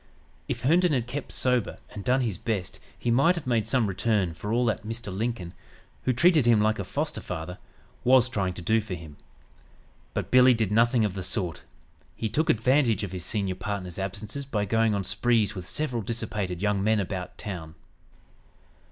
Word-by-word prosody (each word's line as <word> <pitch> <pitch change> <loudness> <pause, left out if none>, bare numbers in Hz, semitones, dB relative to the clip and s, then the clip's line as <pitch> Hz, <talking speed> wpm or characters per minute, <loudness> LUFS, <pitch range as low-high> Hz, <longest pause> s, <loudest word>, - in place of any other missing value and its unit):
If - - -3
Herndon 170 +4 +4
had 125 -4 +1
kept 135 +3 -5
sober 125 -3 +1
and 100 - -7
done 130 +4 +2
his 110 -8 -2
best 100 -6 -3 0.2
he 120 - -1
might 140 +9 +4
have 170 - -5
made 115 -4 +1
some 125 -1 +2
return 100 -2 0
for 105 +6 -5
all 120 +2 +2
that 110 -3 0
Mr. 110 -3 -5
Lincoln, 105 -5 -3 0.5
who 130 - +3
treated 155 +1 +4
him 115 -2 +6
like 110 +1 +2
a - - -1
foster - - -3
father, 85 +3 -6 0.4
was 130 -1 +6
trying 95 -6 -2
to 90 - -7
do 110 +5 +3
for 105 -3 -5
him. 80 -3 -10 1.0
But - - -3
"Billy" 125 0 +7
did 110 -3 0
nothing 115 +1 +4
of 100 - -2
the 95 - -4
sort. 90 -2 -2 0.5
He 110 - -2
took 155 +9 0
advantage 120 -1 +3
of 100 - -4
his 90 -2 -5
senior 100 -3 -1
partner's 95 -2 -5
absences 105 +8 -4
by 105 -6 -1
going 110 +1 +2
on 100 - -1
sprees 105 +2 +2
with 90 -4 -7
several 125 +2 -1
dissipated 105 -4 -3
young 105 -2 +1
men 110 +1 +3
about 95 -2 -4
town. 80 -6 -6
110 Hz, 185 wpm, -27 LUFS, 95-120 Hz, 1.0 s, Billy